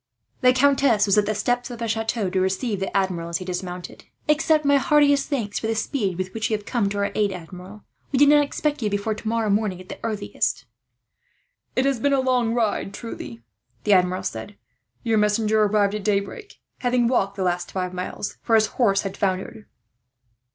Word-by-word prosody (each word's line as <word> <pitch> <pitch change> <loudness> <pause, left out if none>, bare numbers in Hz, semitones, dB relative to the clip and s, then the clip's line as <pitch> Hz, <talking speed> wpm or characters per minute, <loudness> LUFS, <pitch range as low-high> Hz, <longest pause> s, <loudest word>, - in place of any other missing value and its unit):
The 250 -1 +6
countess 265 -4 +3
was 200 - +3
at 205 - 0
the 215 - 0
steps 245 +4 -1
of 240 - -7
the 230 0 -3
chateau, 225 -1 -1
to 185 - +1
receive 195 +3 -1
the 195 +1 -1
Admiral 180 -3 -1
as 170 - -1
he 185 - -8
dismounted. 180 -1 -6 0.2
"Accept 305 0 +3
my 285 0 +5
heartiest 285 -1 +3
thanks 230 -8 -2
for 220 - -3
the 225 - 0
speed 215 -5 -1
with 185 0 -4
which 225 0 -2
you 215 - +1
have 205 - -15
come 230 -6 0
to 205 - -4
our 200 0 0
aid, 205 -2 +1
Admiral. 185 +3 -10 0.3
We 275 - +1
did 290 +2 +6
not 295 0 +6
expect 290 0 -2
you 215 - 0
before 205 +2 -1
tomorrow 220 0 -1
morning, 200 -3 0
at 185 - -13
the - - -7
earliest." 215 -3 -2 1.1
"It 255 - +2
has 275 -3 +1
been 280 +4 +2
a 275 - +3
long 250 -3 +1
ride, 215 -4 -1
truly," 120 - -8 0.4
the 205 - +3
Admiral 185 0 +2
said. 110 - -5 0.5
"Your 225 -2 +2
messenger 215 +1 +2
arrived 205 -1 +2
at 210 -1 -4
daybreak, 205 - -2 0.2
having 245 -1 +2
walked 200 -5 +1
the 195 - -2
last 175 -1 -1
five 185 -1 -3
miles, 180 +2 -5
for 225 - +2
his 220 -1 +5 0.2
horse 195 -4 +4
had 195 -1 -5
foundered. 195 +2 -3
210 Hz, 200 wpm, -23 LUFS, 195-245 Hz, 1.1 s, The